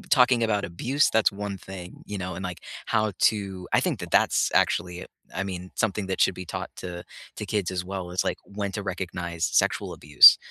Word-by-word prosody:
talking 125 -1 +5
about 105 -3 0
abuse, 125 +12 +1
that's 110 -2 +3
one 100 0 -5
thing, 90 -1 -10
you 105 -1 -5
know, 90 -1 -4
and, 95 +2 -6
like, 90 -3 -5 0.3
how 110 -2 +1
to 95 -4 +1
I - - +5
think - - -1
that - - -7
that's - - +3
actually, 90 0 +1 0.3
I 95 - -1
mean, 90 -1 -6
something 105 -2 0
that 95 - -2
should - - +4
be 90 - -7
taught - - -5
to 90 -1 -6 0.3
to - - -5
kids 100 -4 -1
as 90 -1 -3
well 95 -1 -5
is, 90 +2 0
like, - - -1
when 100 0 -4
to 105 - -4
recognize 90 -3 -4
sexual - - +1
abuse, 75 0 +8
95 Hz, 205 wpm, -26 LUFS, 90-105 Hz, 0.3 s, abuse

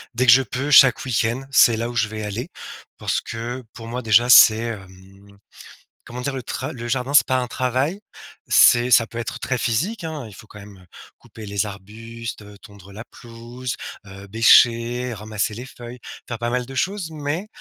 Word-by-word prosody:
dès 125 +2 +1
que 115 - +7
je 135 +2 +7
peux, 140 +3 -4
chaque 130 -3 +6
week-end, 120 +1 -1
c'est 120 -3 +5
là 115 +1 -3
où 120 - -8
je 110 -2 +1
vais 110 0 -7
aller, 115 - -5 0.5
parce - - -1
que, 120 +3 -6
pour 115 -2 -10
moi, 125 +2 -5
déjà, 115 +1 +3
c'est, 115 -2 +8
hem, 100 -2 -10 0.7
comment 125 +1 -8
dire? 135 +1 -4
Le 130 - -6
tra 130 +6 -5
le 120 -2 -8
jardin, 130 +3 -2
c'est - - +7
pas 130 - +1
un 125 - -2
travail. 130 - -2 0.5
C'est 120 +1 +5
ça 115 0 +5
peut 115 - -10
être 115 - -6
très 130 - -2
physique, 170 - -2
hein, 155 -5 -6
il 105 - -13
faut 110 - -15
quand 105 - -13
même, 100 -1 -13
heu, 90 - -19 0.3
couper 110 -1 -13
les 100 +1 -2
arbustes, 115 +4 -9
heu, 105 0 -14
tondre 100 -2 -16
la 110 +3 -9
pelouse, 120 +2 -9 0.3
heu, 95 +1 -12
bêcher, 115 +3 +3
ramasser 105 0 -4
les 120 +4 -8
feuilles, 120 0 -11 0.3
faire 115 -2 -6
pas 120 0 -2
mal 125 0 -2
de 135 +2 -11
choses 185 +2 -2
mais 155 +5 -4
120 Hz, 200 wpm, -21 LUFS, 110-130 Hz, 0.7 s, c'est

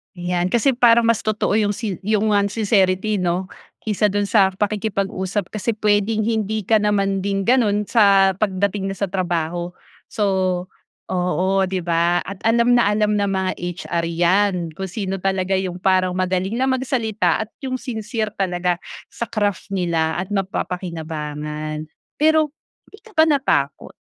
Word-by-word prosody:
'Yan 175 0 -1
kasi 235 +7 +2
parang 235 -1 +6
mas 230 -2 +1
totoo 215 0 +1
'yong 205 -1 +1
sin 210 -5 -4
'yong 215 0 +2
ngang 200 -1 +3
sincerity 200 -1 +1
'no? 180 +1 -1 0.3
Kaysa 210 -1 +1
do'n 205 0 0
sa 195 -3 +4
pakikipag-usap 200 -2 -2
kasi 215 +1 -2
puwedeng 210 +1 +1
hindi 220 -1 -1
ka 220 +3 +3
naman 200 -2 +1
din 195 +1 -1
gano'n 220 -4 +3
sa 200 -3 +5
pagdating 200 -1 0
na 195 - -4
sa 200 -3 -2
trabaho. 175 -1 -2 0.3
So 215 - -4 0.9
oo 180 0 0 0.2
'di 185 -1 -2
ba 170 +1 +2
at 195 0 -8
alam 235 +1 +3
na 235 - +3
alam 210 0 +1
ng 200 0 +1
mga 190 -1 0
HR 175 -1 -3
'yan. 180 +4 +2 0.2
Kung 190 - -3
sino 195 0 -4
talaga' 190 0 0
'yong 180 -1 -4
parang 185 -1 +2
magaling 185 +2 -1
lang 260 +2 +1
magsalita 240 -5 0
at 220 - -8
yo'ng 260 -2 -4
sincere 220 -3 -4
talaga 180 -2 0 0.3
sa 235 - -4
craft 205 -4 -1
nila 165 -3 0
at 185 +2 -4
mapapakinabangan. 155 -5 -4 0.3
Pero 310 -1 +3 0.3
hindi 415 - -17
ka 445 - -17
ba 315 - +7
natakot 265 - 0
195 Hz, 150 wpm, -21 LUFS, 180-215 Hz, 0.9 s, ba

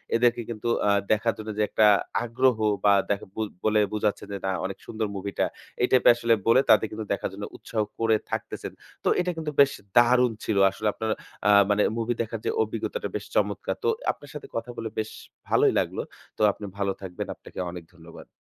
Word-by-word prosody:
এদেরকে 120 0 +3
কিন্তু 115 0 -5 0.2
আ - - +5 0.2
দেখার 110 +2 +2
জন্য 110 0 -7
যে 105 - +2
একটা 110 -1 +4 0.4
আগ্রহ 120 0 +2 0.3
বা 100 - +7 0.2
দেখ 100 - 0
বু 110 - -3 0.2
বলে 110 0 +4
বুঝাচ্ছেন 105 -1 -1
যে, - - -2
"না, 95 - +1
অনেক - - -4
সুন্দর 110 -1 -3
মুভিটা।" 100 +1 -1 0.4
এই 125 - +4
টাইপের 125 -2 +7
আসলে 115 -1 +2
বলে 125 +3 +6
তাদের 110 - +6
কিন্তু 110 0 -5
দেখার 100 - -2
জন্য 100 +1 -6
উৎসাহ 110 -2 -3 0.2
করে 115 -1 +3 0.2
থাকতেছেন। - - -4 0.3
তো - - +2
এটা 180 0 +1
কিন্তু 155 -2 -3
বেশ 140 0 +5 0.3
দারুণ 125 0 +5
ছিল। 100 - 0
আসলে 110 +2 -3
আপনার 110 0 -2 0.4
আ - - +6 0.2
মানে 105 0 +3 0.2
মুভি 115 +1 0
দেখার 115 - -4
যে - - +1
অভিজ্ঞতাটা 485 - -3
বেশ - - -3
চমৎকার। - - 0
তো - - +1 0.2
আপনার 145 - -14
সাথে 150 - -8
কথা 115 +2 -3
বলে 115 -1 -4
বেশ 110 - -3 0.4
ভালোই - - +4
লাগলো, - - -2 0.4
তো - - -5
আপনি 105 - -9
ভালো 100 -1 0
থাকবেন। 90 -2 -5
আপনাকে - - -11
অনেক 90 -1 -8
ধন্যবাদ। 85 -1 -13
110 Hz, 195 wpm, -26 LUFS, 105-120 Hz, 0.4 s, বা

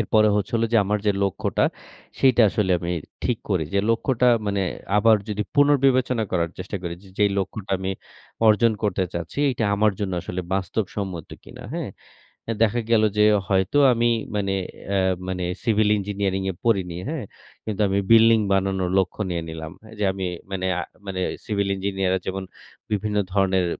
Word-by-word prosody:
এরপরে 110 0 +3
হচ্ছে 105 -1 -2
হলো 115 - +1
যে 115 - +5
আমার 105 +2 0
যে 105 - +4
লক্ষ্যটা 100 -2 0 0.5
সেইটা 130 -3 +5
আসলে 95 -2 0
আমি 85 +1 -3 0.3
ঠিক 125 -3 0
করি। 90 -5 +1
যে 100 - +4
লক্ষ্যটা 125 +1 +2 0.2
মানে 100 -1 0 0.3
আবার 110 +1 +5
যদি 105 0 -1
পুনর্বিবেচনা 135 -4 +3
করার 85 -2 0
চেষ্টা 95 +2 -5
করি, 85 -1 -4
যে 100 - -15
যেই 105 -1 +4
লক্ষ্যটা 95 +1 -4
আমি 95 0 -3 0.6
অর্জন 110 +1 +5
করতে 100 -3 +1
চাচ্ছি 85 - -5
এইটা 120 -3 -1
আমার 105 0 +3
জন্য 95 -2 -2
আসলে 90 - -4
বাস্তবসম্মত 95 -2 -3
কিনা - - -12
হ্যাঁ? - - -3 0.6
এ - - +2
দেখা 115 +2 +1
গেল 110 -2 +5
যে 105 - +5 0.2
হয়তো 95 +6 +1 0.2
আমি 120 0 +2 0.3
মানে 100 -2 0 0.4
অ্যাঁ 95 -1 +2
মানে 90 -1 -3 0.2
সিভিল 110 -3 +2
ইঞ্জিনিয়ারিং 100 -1 -2
এ - - -10
পড়িনি, 95 -7 +1
হ্যাঁ? 155 -6 -3 0.4
কিন্তু 110 -1 -3
আমি 95 +1 +1
বিল্ডিং 115 0 +7
বানানোর 95 -1 0
লক্ষ্য 95 +2 -2
নিয়ে 85 -2 -2
নিলাম, 80 -1 -7 0.3
যে 105 - -2
আমি 95 -1 -4 0.3
মানে 95 -1 -2
আ - - -1 0.2
মানে 95 -1 -4 0.3
সিভিল 100 -3 -1
ইঞ্জিনিয়ার 95 -1 -1
রা 95 - +1
যেমন 95 0 -3 0.5
বিভিন্ন 105 0 -1
ধরনের 95 -2 +2
100 Hz, 170 wpm, -23 LUFS, 95-110 Hz, 0.6 s, বিল্ডিং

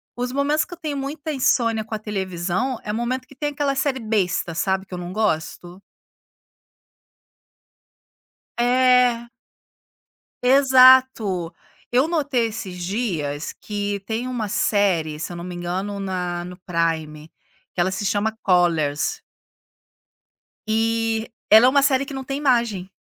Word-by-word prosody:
Os 245 +1 -3
momentos 290 +3 +1
que - - -11
eu - - -9
tenho 300 -3 -4
muita 290 +3 -4
insônia 240 -5 +1
com 220 - -9
a 215 - -2
televisão 195 +3 -2
é 210 - -3
o - - -3
momento 255 +2 -2
que 275 - -16
tem 295 +2 -2
aquela 285 -1 -1
série 270 -1 0
besta, 195 -7 -1
sabe, 190 +2 0
que - - -12
eu - - -4
não 175 +1 -6
gosto. 175 -3 -2 2.8
É. 245 -1 +3 1.1
Exato, 255 -8 +5 0.4
eu 255 +4 +3
notei 290 -8 0
esses 185 -5 -6
dias, 170 -9 -3
que 205 -1 -4
tem 230 +3 -3
uma 240 -4 -3
série, 190 -7 +1
se 165 - -5
eu - - -7
não 170 - -7
me 180 0 -6
engano 185 +4 -4
na 180 -3 -3
no 180 +1 -9
Prime, 165 -3 -2 0.5
que - - -2
ela 185 +2 +2
se 190 +2 -4
chama 205 +2 0
Collars. 165 -6 +1 1.5
E 225 0 0 0.2
ela 220 +3 +8
é - - +7
uma 280 +1 +4
série 270 -1 +3
que 275 - -9
não 265 - -5
tem 275 +1 -3
imagem. 235 -9 0
220 Hz, 145 wpm, -22 LUFS, 180-255 Hz, 2.8 s, ela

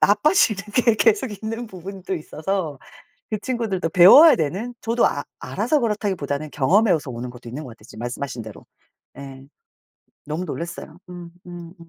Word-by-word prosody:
나빠지는 215 - +3
게 235 -2 +4
계속 220 +3 +2
있는 225 +3 -5
부분도 190 -1 -7
있어서 160 -1 -4 0.5
그 215 - -1
친구들도 220 -9 -2
배워야 200 - +8
되는. 190 +10 -3
저도 230 +1 +1
아 - - -1 0.2
알아서 305 -2 -1
그렇다기보다는 190 - -2
경험에서 170 - +2
오는 120 +1 -6
것도 120 -1 -12
있는 130 +6 -6
것 125 - -9
같아요 115 -2 -16
지금 110 - -11
말씀하신 120 0 -5
대로. 110 -2 -12 0.5
예. 135 -1 -10 0.8
너무 155 +5 -3
놀랐어요. 170 -1 -7
음음음. 175 0 -11
180 Hz, 355 characters per minute, -22 LUFS, 145-215 Hz, 0.8 s, 배워야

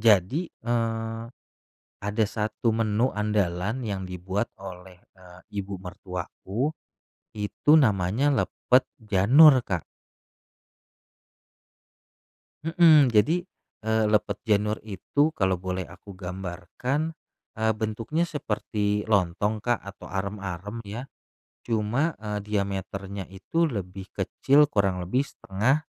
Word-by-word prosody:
jadi, 115 - +3
eee, 115 -1 -2 0.8
ada 105 +2 +1
1 110 +2 -2
menu 115 +2 +2
andalan 105 +1 0
yang 100 -2 -2
dibuat 95 +4 -3
oleh, 90 -1 -10 0.2
eee, 90 -1 -15 0.2
ibu 95 0 -6
mertuaku, 95 - -4 0.7
itu 105 +7 0
namanya 105 +1 +2
lepet 130 -1 +3 0.2
janur, 125 +8 +7
Kak. 90 -7 -2 2.8
Mhm, 165 -4 +6
jadi, 125 +10 +3 0.4
eee, 110 0 +1
lepet 105 - +2
janur 105 -1 +2
itu, 145 - 0
kalau 95 - +1
boleh 90 0 -4
aku 100 - -12
gambarkan, 95 - -4 0.4
eee, 110 0 +2
bentuknya 110 +10 -1
seperti 105 -7 -1
lontong, 105 +2 +1
Kak, 120 -1 +1
atau 100 -1 -11
arem-arem 100 0 -4
ya, 115 +7 -6 0.6
cuma, 120 +8 +1
eee, 105 -1 -4
diameternya 100 -1 -3
itu 165 - 0
lebih 95 - -5
kecil, 145 +2 +4
kurang 95 -5 +1
lebih 130 +10 0
1/2, 125 +11 0
105 Hz, 100 wpm, -26 LUFS, 95-120 Hz, 2.8 s, janur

